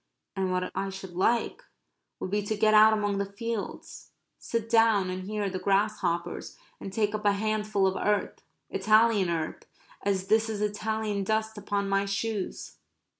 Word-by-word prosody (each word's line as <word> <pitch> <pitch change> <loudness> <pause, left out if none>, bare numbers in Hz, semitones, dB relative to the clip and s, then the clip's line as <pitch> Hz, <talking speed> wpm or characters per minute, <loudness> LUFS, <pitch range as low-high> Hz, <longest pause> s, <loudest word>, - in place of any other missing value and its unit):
And 190 -1 -1
what 185 0 -1
I 195 +1 -1
should 190 -2 -8
like 230 - +1 0.6
would 185 - -4
be 210 +1 +1
to 205 +1 -3
get 215 +1 +4
out 215 +1 +8
among 205 -2 0
the 200 0 -3
fields, 230 +1 -5 0.3
sit 230 -1 -3
down 225 -5 +4
and 185 0 -5
hear 210 0 -2
the 185 -1 -3
grasshoppers, 195 -3 -1 0.2
and 195 - -7
take 210 +1 0
up 215 0 -3
a 205 -1 +4
handful 215 -1 0
of 190 0 +1
earth 205 +1 -1 0.3
Italian 215 -1 +4
earth, 165 -2 -3 0.4
as 195 -2 0
this 220 +2 +2
is 215 -2 -3
Italian 210 0 -1
dust 220 +2 -1
upon 200 -1 -2
my 195 0 +1
shoes. 205 0 -3
205 Hz, 165 wpm, -28 LUFS, 195-215 Hz, 0.6 s, out